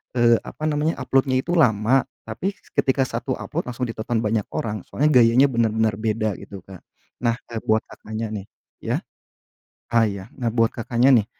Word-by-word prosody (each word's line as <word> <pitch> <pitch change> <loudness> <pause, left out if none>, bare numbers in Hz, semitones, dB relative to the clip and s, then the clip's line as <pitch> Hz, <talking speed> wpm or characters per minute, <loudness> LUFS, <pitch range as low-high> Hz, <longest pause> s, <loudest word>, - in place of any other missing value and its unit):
eee, 120 -1 +5
apa - - -10
namanya, 150 +2 0
upload-nya 130 0 +2
itu 175 - -4
lama, 125 -2 +3 0.2
tapi 175 - -4 0.2
ketika 135 0 +2
1 130 - -3
upload - - -4
langsung 125 +1 -4
ditonton, 115 +1 -2
banyak 105 -1 0
orang. 105 -2 -2
Soalnya 150 +3 +1
gayanya 115 +4 +5
benar-benar 110 -3 +1
beda 110 0 0
gitu 95 -3 -10
Kak. 95 -2 -11 0.4
Nah, 115 -1 +2 0.2
eee, 115 - -3
buat 110 0 +2
Kakaknya 110 0 -6
nih 100 -3 -5 0.3
ya, - - -1 1.0
ah, 115 -1 +5
ya. 100 -3 -3
Nah, 120 -3 -1
buat 115 0 +2
Kakaknya 120 +2 +3
nih, 110 -4 +3
115 Hz, 170 wpm, -23 LUFS, 110-130 Hz, 1.0 s, eee